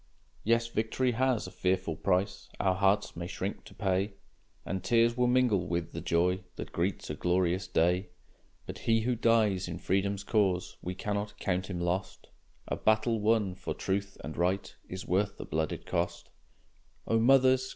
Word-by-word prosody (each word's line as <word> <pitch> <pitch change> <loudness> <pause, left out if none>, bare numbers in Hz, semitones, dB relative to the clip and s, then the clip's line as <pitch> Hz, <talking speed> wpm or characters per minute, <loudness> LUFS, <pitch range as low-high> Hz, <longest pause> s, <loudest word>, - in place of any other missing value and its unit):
Yes, 115 +1 +3
victory 115 +3 0
has 125 -1 +1
a - - -8
fearful 90 -3 0
price 95 +4 0
Our 95 -1 +3
hearts 100 +2 +2
may 85 +1 -4
shrink 95 +2 -4
to - - -14
pay, 100 0 0 0.5
And 95 -1 -3
tears 115 +4 +3
will 125 0 +2
mingle 125 -7 +3
with 85 +1 -2
the - - -5
joy 90 +2 +2 0.2
That - - -7
greets 90 -1 -2
a - - -2
glorious 90 +3 +1
day. 90 +3 +2 0.6
But - - -7
he 115 -1 +2
who 125 +3 +1
dies 110 -5 +2
in 85 - -4
freedom's 100 +1 0
cause, 100 -4 +1
We 90 +1 -4
cannot 105 +1 -3
count 95 -1 -1
him 90 -2 -3
lost; 90 +2 -3 0.4
A - - -1
battle 110 +1 +2
won 105 -3 +2
for - - -5
truth 100 +1 -2
and 75 - -6
right 90 +3 0
Is 95 +1 -6
worth 100 +2 0
the - - -6
blood 80 0 -1
it - - -6
cost! - - -2 0.8
O 115 - +3
mothers! 130 +1 +5
100 Hz, 170 wpm, -30 LUFS, 90-115 Hz, 0.8 s, mothers